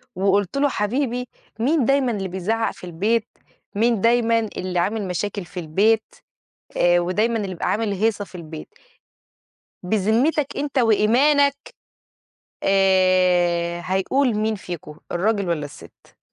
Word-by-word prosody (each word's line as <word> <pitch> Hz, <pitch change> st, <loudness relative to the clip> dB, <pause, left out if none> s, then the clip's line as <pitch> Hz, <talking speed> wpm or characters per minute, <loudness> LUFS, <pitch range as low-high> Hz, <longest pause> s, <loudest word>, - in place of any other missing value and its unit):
وقُلت 200 Hz, +4 st, +1 dB
له 285 Hz, +1 st, +2 dB
حبيبي 250 Hz, +2 st, -2 dB, 0.3 s
مين 275 Hz, +2 st, +2 dB
دايمًا 275 Hz, -1 st, +2 dB
اللي 195 Hz, -4 st, -3 dB
بيزعق 200 Hz, +5 st, -1 dB
في -, -, -18 dB
البيت؟ 210 Hz, +7 st, -1 dB, 0.5 s
مين 225 Hz, -1 st, +2 dB
دايمًا 230 Hz, -1 st, +3 dB
اللي 185 Hz, -5 st, -3 dB
عامل 205 Hz, +2 st, -1 dB
مشاكل 190 Hz, +2 st, -3 dB
في 180 Hz, +2 st, -8 dB
البيت؟ 205 Hz, +8 st, +1 dB, 0.6 s
آآ، 175 Hz, 0 st, +4 dB
ودايمًا 210 Hz, +7 st, 0 dB
اللي 205 Hz, -3 st, -2 dB
بيبقى 185 Hz, -, -3 dB
عامل 215 Hz, -1 st, 0 dB
هيصة 210 Hz, +1 st, 0 dB
في 190 Hz, -, -20 dB
البيت؟ 160 Hz, -3 st, -9 dB, 1.1 s
بذمتك 220 Hz, -, +1 dB
أنت 280 Hz, -1 st, -2 dB
وإيمانك 255 Hz, +6 st, +3 dB, 1.1 s
آآ، 185 Hz, -3 st, +2 dB
هيقول 225 Hz, +8 st, +1 dB
مين 215 Hz, +1 st, 0 dB
فيكم 170 Hz, -6 st, -8 dB
الراجل 200 Hz, +2 st, 0 dB
والّا 155 Hz, -3 st, -1 dB
السِت؟ 145 Hz, -, -15 dB
205 Hz, 125 wpm, -22 LUFS, 180-230 Hz, 1.1 s, آآ